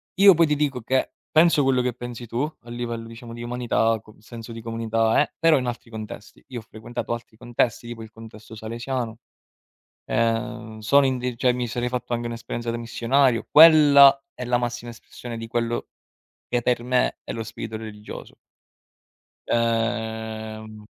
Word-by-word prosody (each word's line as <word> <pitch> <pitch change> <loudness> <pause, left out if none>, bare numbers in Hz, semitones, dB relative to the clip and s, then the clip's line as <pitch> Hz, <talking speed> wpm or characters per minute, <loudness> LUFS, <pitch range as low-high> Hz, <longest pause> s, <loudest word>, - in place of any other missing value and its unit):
Io 195 +1 +8
poi 165 -1 +4
ti 150 - +1
dico 140 -4 -1
che 130 +3 0 0.2
penso 160 -1 +5
quello 130 -2 +3
che 125 -1 -1
pensi 120 0 -7
tu 120 +3 -2 0.2
a 120 - -14
livello, 120 -1 -4
diciamo, 115 0 -10
di 120 0 -7
umanità, 120 -2 0
co 110 -1 -18
senso 115 +1 -10
di 115 - -7
comunità, 115 -1 +1
eh, - - -1
però 165 -3 +5
in 125 - -3
altri 120 -1 -6
contesti. 110 -1 -9
Io 125 -2 -5
ho - - -12
frequentato 115 +2 -5
altri 115 -2 -8
contesti, 120 -1 -1
tipo 120 -1 -7
il 110 - -11
contesto 110 0 -12
salesiano. 115 +1 -4 0.9
Ehm, 115 0 -1
sono 140 +6 +4
in 130 -1 0
di 125 -1 -3
cioè 125 +1 +3
mi 125 -1 -2
sarei 120 +1 -2
fatto 125 -1 -2
anche 120 0 -3
un'esperienza 115 0 -5
da 115 - -3
missionario. 120 +1 +1
Quella 145 -4 +8
è 125 - -6
la 120 0 +2
massima 120 0 -4
espressione 120 0 -9
di 115 - -6
quello 120 0 -2 0.6
che, 120 0 0
per 120 0 +1
me, 125 0 +1
è - - -5
lo 115 -1 -4
spirito 110 0 -7
religioso. 105 -1 -9 1.1
Ehm 110 -2 -2
120 Hz, 170 wpm, -24 LUFS, 115-125 Hz, 1.1 s, Io